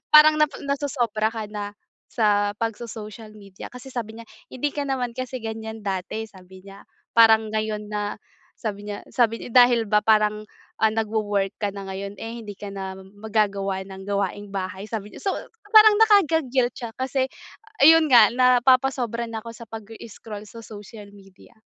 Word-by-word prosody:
parang 305 0 +8
napa 300 -1 +1
nasosobra 245 -6 -1
ka 220 -1 -4
na 205 -1 -5 0.4
sa 205 -2 +1
pagso-social 225 -1 -6
media 195 -2 -11
kasi 250 +2 -11
sabi 225 -2 -5
niya, - - -9 0.3
"Hindi 290 +3 -2
ka 290 - -2
naman 250 -3 -2
kasi 255 0 -5
ganiyan 220 -1 -6
dati," 195 +3 -3
sabi 185 -1 -16
niya. 195 0 -13 0.3
Parang 220 -1 +6
ngayon 215 -1 -2
na, 205 0 -3 0.4
sabi 205 -2 -5
niya 205 - -5
sabi 230 -2 +1
niya, - - -8 0.2
dahil 235 -3 +1
ba 210 -1 +3
parang, 215 -1 +3 0.4
ah, 220 -1 +4
nagwo-work 210 -3 -1
ka 205 -1 0
na 195 -1 -7
ngayon, 195 +1 -5
eh, 230 +1 -6
hindi 205 - -7
ka 205 - -7
na 190 -1 -5
mag-gagawa 200 -1 -2
ng 190 0 -9
gawaing 200 0 -2
bahay, 190 +1 -4
sabi 210 -2 -5
niya. - - -10
So 390 - 0 0.4
parang 430 -1 +9
nakaka-guilt 315 - +3
siya 235 -2 -6
kasi 260 0 0 0.6
ayun 325 0 +7
nga, 235 -5 +7
napapasobra 250 -1 +3
na 220 -1 -6
ako 230 - -7
sa 235 0 -11
pag-i-scroll 220 -1 -9
sa 230 - -11
social 210 -1 -11
media. 195 +1 -18
220 Hz, 165 wpm, -24 LUFS, 205-245 Hz, 0.6 s, parang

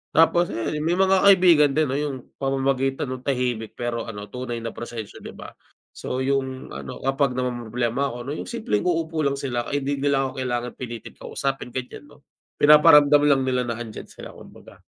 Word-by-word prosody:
Tapos 165 +2 +4
ayan 130 +7 -3
may 165 +3 0
mga 190 +1 +4
kaibigan 175 -7 +6
din 155 -1 +2
'no 135 - 0
yung 145 -2 -2 0.2
pamamagitan 135 0 0
ng 130 - -4
tahimik 125 -5 -2
pero 120 -1 -3
ano 105 -2 -8
tunay 120 -2 -5
na 115 - -4
prosesyo 115 -3 -8
'di - - -10
ba? - - -10 0.4
So 130 +1 -4
yung 130 -1 -2
ano 70 - -8
kapag 135 -1 +1
namomroblema 125 +1 -1
ako - - -6
'no 135 - -5
yung - - -6
simpleng 220 - -2
uupo 165 -2 -1
lang 140 - 0
sila 120 -4 -3
kay 145 -1 -2
di 140 +1 -2
nila 140 -1 +1
ako 135 0 -4
kailangan 125 -1 -2
pilitin 120 -3 -7
kausapin, 135 -2 -3
ganyan 130 +3 -6
'no. 145 0 -18 0.4
Pinaparamdam 150 -1 +7
lang 140 -2 +4
nila 125 -1 0
na 120 - -2
andiyan 115 -2 -8
sila - - -11
kumbaga. - - -15
135 Hz, 185 wpm, -23 LUFS, 120-145 Hz, 0.4 s, Pinaparamdam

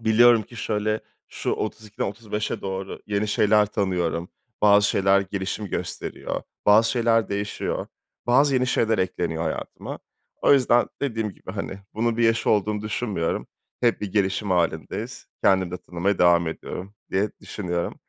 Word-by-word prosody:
Biliyorum 115 +1 +6
ki 120 +3 -14
şöyle, 110 0 -1 0.3
şu - - -3
32'den 105 -1 -3
35'e 105 +1 -3
doğru 95 0 -5
yeni 105 0 0
şeyler 105 0 +4
tanıyorum. 90 -4 -1 0.3
Bazı 100 -1 +6
şeyler 95 0 +4
gelişim 100 +1 -3
gösteriyor, - - -4 0.2
bazı 110 +2 +6
şeyler 115 -2 +2
değişiyor, 100 +1 -2 0.4
bazı 135 +3 +4
yeni 130 0 +2
şeyler 110 -4 +2
ekleniyor 85 -3 -1
hayatıma. 80 - -5 0.4
O - - +6
yüzden 125 -3 +4
dediğim 115 -6 -1
gibi, 95 - -10
hani, 100 -1 -5 0.2
bunun 115 +1 0
bir 120 - +1
yaşı 115 0 +3
olduğunu 105 0 +1
düşünmüyorum. 105 -5 -2 0.3
Hep 120 -1 +2
bir 100 -3 -4
gelişim 100 0 +1
hâlindeyiz. 85 -3 -1 0.2
Kendimi 95 -2 +3
de 90 - -3
tanımaya 90 +4 -1
devam 85 -1 +5
ediyorum 95 +4 -7 0.2
diye 100 +3 +1
düşünüyorum. 90 -4 -3
105 Hz, 145 wpm, -24 LUFS, 95-110 Hz, 0.4 s, Biliyorum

